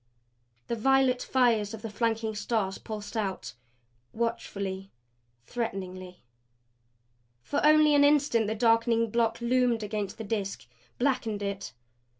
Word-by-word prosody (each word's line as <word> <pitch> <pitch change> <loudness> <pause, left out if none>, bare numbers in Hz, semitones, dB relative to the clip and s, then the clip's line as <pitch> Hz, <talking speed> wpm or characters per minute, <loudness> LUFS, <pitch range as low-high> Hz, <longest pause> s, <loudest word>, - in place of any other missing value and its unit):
The 235 - -2
violet 260 +1 +3
fires 230 -5 +1
of 215 - -13
the 225 - -4
flanking 225 0 -1
stars 205 -2 -2
pulsed 215 0 -7
out 195 - -3 0.6
watchfully, 200 -4 -3 0.6
threateningly. 185 - -5 1.2
For 290 - -2
only 305 0 +6
an 285 0 +5
instant 285 -6 +3
the 220 - -1
darkening 230 0 +2
block 230 0 +1
loomed 240 -2 +2
against 210 -2 -4
the 225 - -6
Disk; 200 - -3 0.3
blackened 240 -6 0
it. 200 -6 -4
225 Hz, 120 wpm, -28 LUFS, 205-245 Hz, 1.2 s, only